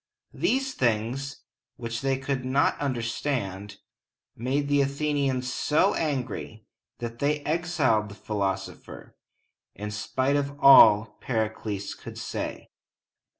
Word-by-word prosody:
These 270 -5 0
things, 125 - -1 0.3
which 115 -1 -5
they 135 -1 +1
could 135 -1 -2
not 135 +3 +2
understand, 115 -6 -3 0.6
made 135 +5 -1
the 145 0 +3
Athenians 140 -2 0
so 160 +6 +2
angry 130 -7 -3 0.3
that 120 0 -6
they 145 +1 +1
exiled 150 -10 +1
the 100 - -10
philosopher, 100 -3 -4 0.6
in 105 +1 -5
spite 130 +6 0
of 140 0 -3
all 110 -6 +7
Pericles 110 -3 -2
could - - -10
say. - - -5
130 Hz, 110 wpm, -26 LUFS, 110-145 Hz, 0.6 s, all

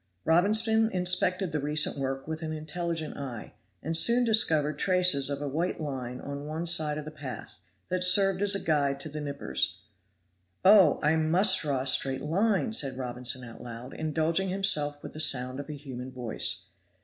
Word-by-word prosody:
Robinson 220 +6 +3
inspected 180 0 +1
the 150 - -2
recent 150 +2 +1
work 135 0 -4
with 160 0 -5
an 160 -1 -4
intelligent 160 +1 -4
eye, 125 -8 -7 0.3
and 165 +2 -2
soon 235 +8 +5
discovered 155 -10 +2
traces 180 -7 +2
of 140 0 -4
a - - -3
white 165 +6 -2
line 130 -5 -5
on 140 +1 -7
one 160 +2 -4
side 155 -3 +2
of 150 - -6
the 155 - -7
path, 140 -4 -8 0.4
that 180 0 0
served 195 +1 +3
as 205 -1 +2
a - - -1
guide 140 -5 0
to 155 - -7
the 150 +1 -6
knippers. 140 - -3 0.8
"Oh! 190 -5 +6
I 155 +2 +3
must 180 +5 +3
draw 140 -4 -1
a - - -5
straight 135 0 +2
line," 200 +7 0
said 135 -10 0
Robinson 125 0 -1
out 115 - -12
loud, 120 +1 -9
indulging 160 +4 -1
himself 150 -7 +1
with - - -8
the 155 - -9
sound 130 -3 +1
of 145 - -8
a - - -4
human 130 -2 -8
voice. 125 -3 -2
155 Hz, 180 wpm, -28 LUFS, 140-180 Hz, 0.8 s, Oh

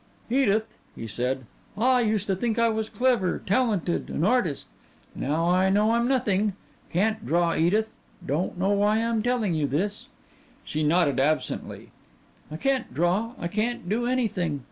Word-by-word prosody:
"Edith," 220 -4 +2 0.2
he 115 - -7
said, 125 +4 -2 0.3
"I 250 +3 +3
used 215 -3 0
to 195 - 0
think 225 +4 -1
I 230 0 +3
was 220 0 -2
clever, 245 -8 +1
talented, 200 -6 0
an 155 - -2
artist. 200 - +1 0.5
Now 160 +5 -1
I 185 +1 +3
know 210 +3 +3
I'm 235 +1 +2
nothing. 210 -6 +1 0.4
Can't 215 +5 0
draw, 170 -3 +1
Edith. 215 +7 +1 0.3
Don't 155 +7 -2
know 190 +3 +1
why 205 +1 +3
I'm 230 -1 0
telling 235 -5 0
you 155 -3 0
this." 195 +10 -2 0.6
She 155 - -3
nodded 150 -2 +2
absently. 155 +3 -1 0.6
"I 155 - -6
can't 265 +5 0
draw, 180 - 0
I 170 - -3
can't 215 +1 -2
do 230 +5 0
anything. 185 - -1
205 Hz, 155 wpm, -26 LUFS, 170-230 Hz, 0.6 s, I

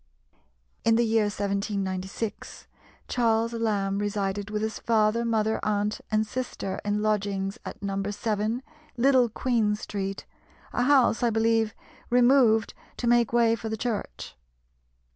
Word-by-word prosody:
In 225 - +4
the 235 +1 +3
year 220 -1 +2
1796 200 0 -3 0.4
Charles 230 -1 +1
Lamb 205 -4 0
resided 205 -1 -2
with 210 0 -2
his 220 -1 -3
father, 225 0 +2
mother, 220 -1 +1
aunt, 210 0 -1
and 215 0 +1
sister 215 -4 -4
in 210 0 -1
lodgings 200 0 -1
at - - -8
No. 195 0 -2
7 215 +3 -2 0.3
Little 255 -1 +4
Queen 220 -2 +1
Street, 195 -2 -5 0.5
a - - 0
house, 260 -5 +4
I 240 - +3
believe, 225 -1 +1 0.3
removed 240 -3 +4 0.2
to - - -3
make 235 -1 +3
way 235 -1 +4
for 230 -1 -6
the 220 - -3
church. 215 - -4
220 Hz, 130 wpm, -26 LUFS, 205-230 Hz, 0.5 s, In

